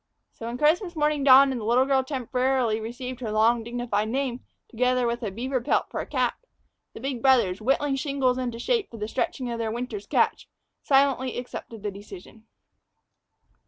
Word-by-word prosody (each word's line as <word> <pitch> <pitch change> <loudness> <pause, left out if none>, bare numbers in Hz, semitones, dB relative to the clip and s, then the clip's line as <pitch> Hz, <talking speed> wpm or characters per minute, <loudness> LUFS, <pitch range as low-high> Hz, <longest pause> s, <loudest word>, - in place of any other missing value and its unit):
So 230 - -8
when 235 +1 -4
Christmas 345 - +2
morning 300 -2 +1
dawned 270 0 +7
and 250 -3 -3
the - - -5
little 245 +3 +3
girl 270 -1 +2
temporarily 255 -3 0
received 245 +3 -6
her 230 -4 -4
long, 225 +2 +3
dignified 235 -3 -2
name, 255 0 -2 0.3
together 250 +1 +1
with 235 0 -1
a 220 - -2
beaver 250 +6 -3
pelt - - 0
for - - -3
a - - -8
cap, - - -1 0.6
the - - -7
big 260 -1 -4
brothers, 230 -8 +3
whittling 270 +3 +1
shingles 270 -3 0
into 240 -2 -3
shape 445 - 0
for 230 - -10
the 210 0 -4
stretching 250 +1 -2
of 235 - -4
their 225 -1 -1
winter's 230 -3 -5
catch, - - +1 0.3
silently 270 -2 +2
accepted 230 -3 -7
the 205 - -2
decision. 200 +2 -12
250 Hz, 180 wpm, -25 LUFS, 230-270 Hz, 0.6 s, dawned